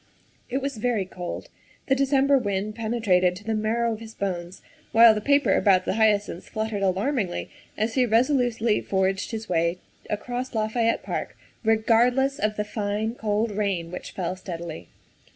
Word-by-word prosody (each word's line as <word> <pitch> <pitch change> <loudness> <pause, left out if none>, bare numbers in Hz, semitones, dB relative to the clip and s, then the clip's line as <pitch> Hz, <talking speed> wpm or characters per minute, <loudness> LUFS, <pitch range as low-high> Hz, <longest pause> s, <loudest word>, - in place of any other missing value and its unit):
It 265 +2 -2
was 275 -3 -3
very 220 -3 0
cold. 180 -1 -7 0.4
The 270 - +2
December 275 +1 +3
wind 205 -2 -2
penetrated 210 -6 +1
to 195 - -11
the 220 +1 -2
marrow 225 +2 0
of 215 - -7
his 225 -1 -11
bones, 180 -2 -4 0.3
while 230 0 +8
the 210 - -3
paper 280 +4 +3
about 190 -3 +3
the - - 0
hyacinths 205 -4 +1
fluttered 220 -2 -3
alarmingly 195 +1 -1 0.3
as 220 +2 0
he 255 -1 +2
resolutely 235 -2 +2
forged 190 0 0
his 225 -1 -5
way 170 0 +1 0.3
across 245 +4 -4
Lafayette 225 +1 +1
Park, - - -4 0.3
regardless 240 +5 +3
of 215 0 0
the 210 - -2
fine, 210 +1 -2
cold 215 -1 -1
rain 195 -5 -2
which 180 - -7
fell 180 -1 -3
steadily. 170 - -7
215 Hz, 155 wpm, -25 LUFS, 195-235 Hz, 0.4 s, while